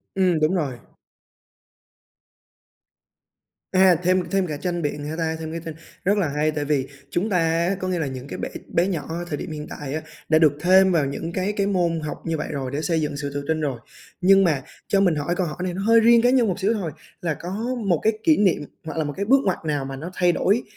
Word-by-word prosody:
Ừm, 180 -4 +2
đúng 155 +4 +2
rồi. 135 -8 -2 2.9
À, 185 -1 +6
thêm 185 +1 +3
thêm 195 -2 +1
cả 150 -2 -4
tranh 175 +3 -2
biện 145 0 -3
hả 155 +2 -4
ta? 160 -1 -1
Thêm 160 -1 -5
cái 165 - -4
tranh 160 - -5 0.3
rất 205 +2 +3
là 185 -6 +2
hay, 150 +2 0
tại 150 -1 -3
vì 140 -3 0 0.2
chúng 190 +8 -1
ta 185 - +2
á 165 +3 +1
có 185 - -3
nghĩa 180 -2 -1
là 155 - -1
những 130 0 -6
cái - - -6
bạn - - -4 0.2
bé 175 +3 +2
nhỏ 170 -6 -2
ở 170 +2 -4
thời 145 - -3
điểm - - -6
hiện 150 0 -6
tại 145 -2 -6
á, 155 - -2 0.3
đã 155 0 +5
được 155 -3 +5
thêm 190 +1 +5
vào 160 -5 +2
những 150 +5 -4
cái 195 +2 -1
cái 200 -1 0
môn 175 -4 +1
học 150 -1 -5
như 165 -1 -1
vậy - - -3
rồi, 135 -3 -3
để 145 +2 -2
xây 165 -1 0
dựng 150 -2 -2
sự 140 -1 -4
tự 145 0 -3
tin 160 -1 0
rồi. 135 -5 -2 0.4
Nhưng 195 +1 +6
mà 150 -7 +2 0.3
cho 195 - +3
mình 180 -5 +3
hỏi 150 +4 -1
câu 180 -1 0
hỏi 150 - -6
này 180 -1 -2
nó 190 - -4
hơi 230 +1 +6
riêng 230 +1 +6
cá 245 - +4
nhân 250 -3 +4
một 190 0 -2
xíu 205 +4 +2
thôi, 190 -8 -3 0.3
là 165 -3 0
có 195 +9 -5 0.2
một 170 -4 +3
cái 220 - +3
kỷ 315 -2 +5
niệm 190 -7 +2 0.2
hoặc 160 - -6
là 160 - +1
một 145 -1 -4
cái 200 - -1
bước 270 +5 +5
ngoặt 185 - +1
nào 145 -3 -1
mà 135 0 -5
nó 160 +6 -6
thay 180 -1 +3
đổi 205 +7 +1
170 Hz, 255 wpm, -23 LUFS, 150-190 Hz, 2.9 s, À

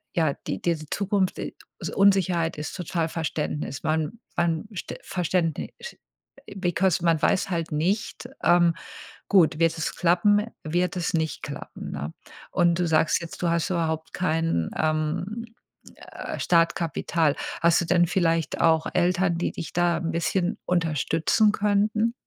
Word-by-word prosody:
ja, 160 -4 +2
die - - -2
diese 160 -3 -1
Zukunft 200 -2 0
i - - -5 0.2
also, - - -5
Unsicherheit 185 -5 +3
ist 150 0 -5
total 170 -2 -2
Verständnis. 150 -3 -3
Man 160 +7 -1 0.2
man 170 +1 0
St - - -5
Verständnis, 175 -2 -1 0.9
because 180 -1 +1
man 165 -2 +3
weiß 185 - +2
halt 165 -2 -2
nicht 190 +10 -1 0.2
ähm, 175 -1 +5 0.5
gut, 165 -5 +4
wird 165 0 +2
es 160 - -2
klappen, 195 +4 +3 0.2
wird 175 +3 0
es 175 - -1
nicht 160 -1 -1
klappen, - - -7
ne? 75 +2 -5 0.4
Und 175 0 +2
du 175 - +1
sagst 155 0 +2
jetzt, 170 - -8
du 175 - +1
hast 170 -1 0
überhaupt 160 -2 -2
kein, 165 - 0
ähm, 155 +8 -1 0.5
äh, - - -7
Startkapital. 165 -2 +1 0.3
Hast 170 0 +4
du - - -2
denn 175 +1 +4
vielleicht 165 -3 0
auch 160 -1 +4
Eltern, 180 0 +2
die - - -1
dich - - -7
da 175 -1 +2
'n 165 -1 -2
bisschen 175 +2 0
unterstützen 165 +4 +2
könnten? 210 +2 +1
170 Hz, 145 wpm, -25 LUFS, 160-180 Hz, 0.9 s, ähm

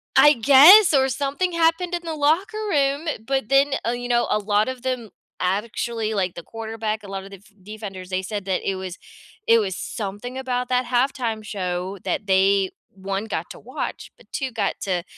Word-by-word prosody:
I 295 - +8
guess, 295 - +8
or 265 -1 +4
something 285 +7 -1
happened 335 +2 +1
in 345 - -4
the 325 - -3
locker 325 +9 +1
room, 285 -1 +1 0.2
but 265 -3 -1
then 275 +1 +4
Oh, 230 - 0
you 245 0 -4
know, 240 -1 +2
a - - +2
lot 210 +2 +1
of 255 -1 -7
them 250 -4 -3 0.3
actually, 220 +3 -2
like, 185 -3 -1
the 170 - -8
quarterback, 220 0 -4
a - - -10
lot 195 0 -5
of 195 - -12
def 200 +2 -14
defenders, 195 -3 -8
they 185 0 -1
said 205 0 -5
that 190 -1 -1
it 195 - -1
was 185 -1 -6 0.5
it 230 - +6
was 190 -3 -2
something 215 +7 -6
about 250 -1 -2
that 250 0 +1
halftime 240 -3 -1
show 185 -2 -4
that 200 +2 -2
they, 195 0 +3 0.2
1, 195 +2 -4
got 225 - -4
to - - -10
watch, - - -6
but - - -22
2, 265 -3 -3
got 225 - -1
to 180 -3 -1
225 Hz, 195 wpm, -23 LUFS, 195-270 Hz, 0.5 s, I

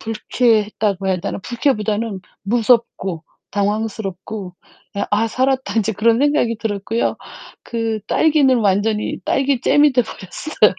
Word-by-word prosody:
불쾌했다고 215 -3 0
해야 185 -1 +1
되나? 180 - -4
불쾌보다는 220 -5 -1 0.2
무섭고 220 -6 +1 0.3
당황스럽고 205 -2 -3 0.4
그냥 200 - -1
'아 220 +2 +2
살았다 260 +3 0
인제.' 220 0 +1
그런 225 +3 +3
생각이 285 -5 +2
들었고요. 220 +1 -1 0.5
그 225 -2 -2
딸기는 290 -5 +3
완전히 210 +1 +1
딸기잼이 280 +2 +3
돼 250 - +4
버렸어요. 220 +7 0
220 Hz, 305 characters per minute, -19 LUFS, 205-245 Hz, 0.5 s, 돼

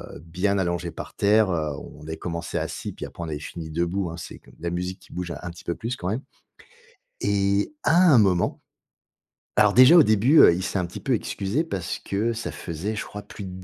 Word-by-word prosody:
heu, - - -9
bien 95 +4 0
allongés 85 -2 -1
par - - -8
terre, 105 0 +4
heu, 80 -3 -1
on 75 - -12
avait 80 0 -5
commencé 85 -1 -4
assis, - - -4
puis - - -7
après - - -10
on - - -5
avait 75 -2 -4
fini 80 +1 -7
debout, 85 +3 -1
hein. 80 - -6
C'est 85 - -8
de - - -18
la 85 - -1
musique 90 +1 -3
qui - - -17
bouge 90 -1 -4
un 90 - -6
petit 85 - -13
peu 85 - -2
plus 115 +2 -4
quand 90 -6 -4
même. 110 +6 -2 1.0
Et 100 +4 +1
à 160 - +3 0.2
un 130 - +7
moment 95 -5 +2 1.0
alors 105 -1 +5
déjà 130 +8 +9
au - - +9
début, 120 +6 +4
heu, - - +8
il 90 - -3
s'est 95 - -2
un 90 - -1
petit 85 - -8
peu - - -1
excusé 100 +10 -1
parce 95 - -4
que 105 +4 -1
ça 115 0 -4
faisait, 95 +6 -5
je - - -3
crois, 105 - -8
plus 105 - -10
de 95 - -6
95 Hz, 230 wpm, -24 LUFS, 85-105 Hz, 1.0 s, déjà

